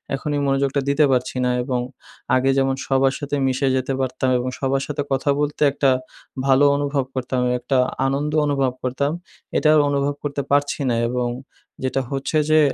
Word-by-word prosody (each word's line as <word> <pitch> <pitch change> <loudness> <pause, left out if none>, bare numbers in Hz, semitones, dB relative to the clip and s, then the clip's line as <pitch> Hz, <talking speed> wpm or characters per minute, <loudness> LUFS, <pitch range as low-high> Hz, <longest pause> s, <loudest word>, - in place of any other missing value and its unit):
এখন 140 - -5
এই - - 0
মনোযোগটা 135 0 +1
দিতে 145 +2 +4
পারছি 130 0 0
না 125 - +2
এবং 125 -1 -1 0.5
আগে 130 +1 +2
যেমন 135 0 +2
সবার 135 0 +2
সাথে 145 0 -3
মিশে 130 +1 0
যেতে 130 +1 -2
পারতাম 130 0 -1
এবং 125 +1 -2
সবার 135 0 0
সাথে 145 -1 -2
কথা 135 +1 0
বলতে 150 0 -2
একটা 140 -1 +2 0.6
ভালো 135 +1 +5
অনুভব 140 -1 -1
করতাম, 130 0 -1 0.2
একটা 130 +2 0 0.3
আনন্দ 140 +3 -1
অনুভব 135 -3 +1
করতাম। 130 +3 -1 0.5
এটাও 155 0 +4
অনুভব 140 0 0
করতে 145 -1 -2
পারছি 145 +1 +1
না 120 - +1
এবং 125 0 -1 0.5
যেটা 130 +1 0
হচ্ছে 135 +3 -1
যে 155 - +6
135 Hz, 170 wpm, -21 LUFS, 130-145 Hz, 0.6 s, যে